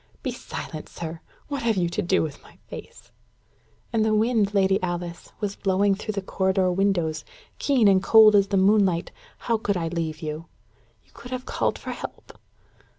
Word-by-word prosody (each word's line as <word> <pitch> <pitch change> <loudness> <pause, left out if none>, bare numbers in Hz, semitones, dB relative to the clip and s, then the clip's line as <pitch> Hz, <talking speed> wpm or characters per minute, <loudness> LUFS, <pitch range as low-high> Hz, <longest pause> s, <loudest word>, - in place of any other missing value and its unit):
"Be 260 - -1
silent, 165 -9 -7
sir. 165 0 -7 0.3
What 285 -2 -3
have 225 -3 +1
you 175 -2 +2
to 190 - -2
do 185 0 +2
with 150 -3 -6
my - - -18
face?" - - -11 0.8
"And 225 -1 +3
the 215 0 +2
wind, 215 -2 +2
Lady 195 -1 +2
Alice, 175 -1 -4
was 200 -2 -2
blowing 195 +1 +2
through 215 +2 -4
the 200 -1 -3
corridor 190 -1 +1
windows, 175 -4 0 0.4
keen 260 -7 +3
and 190 -1 +5
cold 215 +1 +7
as 200 -1 +5
the 195 - 0
moonlight. 190 -3 +3 0.3
How 230 -2 +1
could 200 -3 0
I 165 -2 -2
leave 160 -1 -3
you?" 155 +2 -5 0.6
"You - - -29
could 235 +1 -11
have 255 0 -5
called - - -1
for - - -6
help." - - -8
195 Hz, 180 wpm, -25 LUFS, 175-215 Hz, 0.8 s, cold